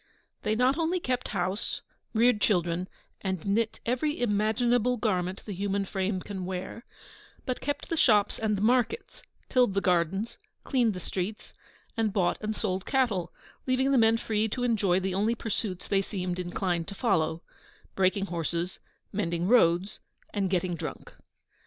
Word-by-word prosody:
They 215 - 0
not 255 +6 +3
only 335 +3 +1
kept 255 -5 -1
house, 185 +4 -2 0.3
reared 230 -1 +3
children, 175 -2 +1 0.3
and 190 -4 -3
knit 215 +3 +1
every 255 +6 0
imaginable 240 +2 +2
garment 190 -4 -1
the 205 - -4
human 200 +1 -1
frame 190 0 -1
can 190 -1 -5
wear, 185 +5 -5 0.6
but 255 - -2
kept 290 +1 -3
the 330 - 0
shops 215 -8 +4
and 215 -2 +1
the 195 - -2
markets, 250 - +1 0.3
tilled 245 -6 +3
the - - +4
gardens, 185 +3 0 0.2
cleaned 240 -7 +2
the - - -4
streets, 190 +4 -4 0.4
and 225 -2 +1
bought 190 -4 +1
and 215 0 -2
sold 190 -3 -1
cattle, 220 -11 +1 0.4
leaving 260 +1 +2
the 275 - +4
men 225 0 +5
free 220 -1 0
to 245 +3 -2
enjoy 205 -7 +2
the 190 0 -2
only 210 +5 +1
pursuits 210 -4 -3
they 195 -1 +2
seemed 185 -3 -3
inclined 175 -1 -1
to 200 - -6
follow 160 -7 +1 0.5
breaking 190 +1 +2
horses, 170 0 -2 0.3
mending 175 -3 -1
roads, 190 -3 +4 0.3
and 200 -2 0
getting 180 -1 0
drunk. 165 - -6
205 Hz, 155 wpm, -28 LUFS, 185-230 Hz, 0.6 s, men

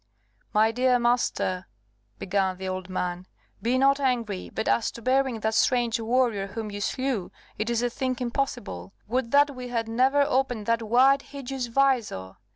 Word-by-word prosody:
"My 220 +1 +4
dear 250 +1 +3
master," 240 -6 0 0.5
began 190 -1 0
the 190 0 -5
old 185 0 -4
man, 180 0 -3 0.3
"be 240 +4 +1
not 275 +1 +4
angry, 235 -8 -1
but 220 - -4
as 230 - +2
to 235 - -9
burying 260 -3 +1
that 220 +1 0
strange 240 0 +2
warrior 230 -3 +1
whom 215 +1 -5
you 205 0 -6
slew, 255 -3 -1 0.3
it 215 +2 -1
is 235 0 0
a 245 - +1
thing 255 -1 -2
impossible. 235 - -3
Would 245 +1 -1
that 285 +1 +4
we 250 0 -6
had 230 -2 -2
never 260 +5 +3
opened 260 -6 0
that 230 +1 +1
wide 255 +5 +4
hideous 270 -3 -5
visor! 235 - 0
235 Hz, 165 wpm, -26 LUFS, 210-260 Hz, 0.5 s, My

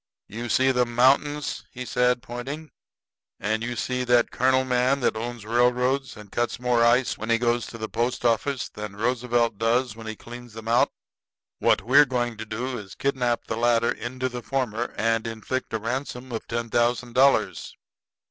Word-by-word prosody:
"You 120 +3 -6
see 130 +4 +4
them 125 -2 0
mountains," 140 +4 +2 0.2
said 125 0 +2
he, - - -27
pointing. 135 +5 -6 0.7
"And 110 +2 -1
you 120 +1 -3
seen 125 +3 -2
that 120 -1 +3
colonel 130 +1 +2
man 130 +2 +2
that 120 - +1
owns 115 0 -5
railroads 125 +3 +1
and 105 -2 -12
cuts 120 0 -1
more 125 -1 +2
ice 120 +2 +3
when 110 - -5
he 115 - +4
goes 120 0 0
to 115 - -9
the 110 -1 -4
post 120 +2 -2
office 120 +3 +1
than 105 -1 -8
Roosevelt 120 -1 0
does 115 +1 +1
when 115 -1 -9
he 110 - -4
cleans 120 0 -11
'em 110 0 -8
out. 115 +1 +4 0.7
What - - +3
we're 135 +6 +6
going 120 -2 -1
to 110 - -6
do 120 +3 -3
is 100 -3 -10
to - - -17
kidnap 125 -3 0
the 110 - -3
latter 115 0 +3
into 130 +2 -3
the 125 -1 -6
former, 120 -3 -2
and 115 0 +1
inflict 115 +3 -4
a 115 - 0
ransom 125 +2 -4
of 115 - -5
ten 115 -1 -3
thousand 120 0 +1
dollars." 135 +2 +2
120 Hz, 185 wpm, -25 LUFS, 115-125 Hz, 0.7 s, we're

